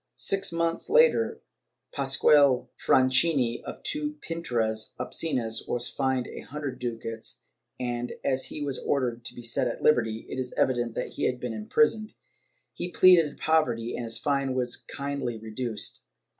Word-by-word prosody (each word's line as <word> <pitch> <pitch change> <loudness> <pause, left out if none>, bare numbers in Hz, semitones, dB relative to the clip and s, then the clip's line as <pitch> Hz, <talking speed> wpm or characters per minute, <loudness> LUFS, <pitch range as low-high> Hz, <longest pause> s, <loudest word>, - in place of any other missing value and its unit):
Six 195 -2 +1
months 165 0 -1
later, 480 +2 +4 0.5
Pasqual 140 -1 +4
Franchini 130 -1 +3
for - - -7
two 300 0 -1
pinturas 115 -10 -1
obscenas 125 -3 -1
was 120 0 0
fined 130 -2 0
a - - -8
hundred 145 -1 -6
ducats 115 -1 -5 0.4
and, 120 -1 -3
as 130 -1 +1
he 150 - -5
was 140 -2 -2
ordered 120 -4 -1
to - - -4
be 120 - -9
set 115 +2 0
at 115 - -5
liberty, 115 -6 +2
it - - -5
is 125 -1 -4
evident 120 -3 +1
that - - -3
he - - -3
had 125 -1 0
been 125 -2 -4
imprisoned; 215 - +1 0.6
he 175 - -4
pleaded 175 -5 +5
poverty 125 -8 +1
and 120 - -4
his 115 0 -1
fine 140 -3 0
was 125 -1 -1
kindly 140 -4 -4
reduced. 110 0 -5
130 Hz, 150 wpm, -27 LUFS, 120-150 Hz, 0.6 s, pleaded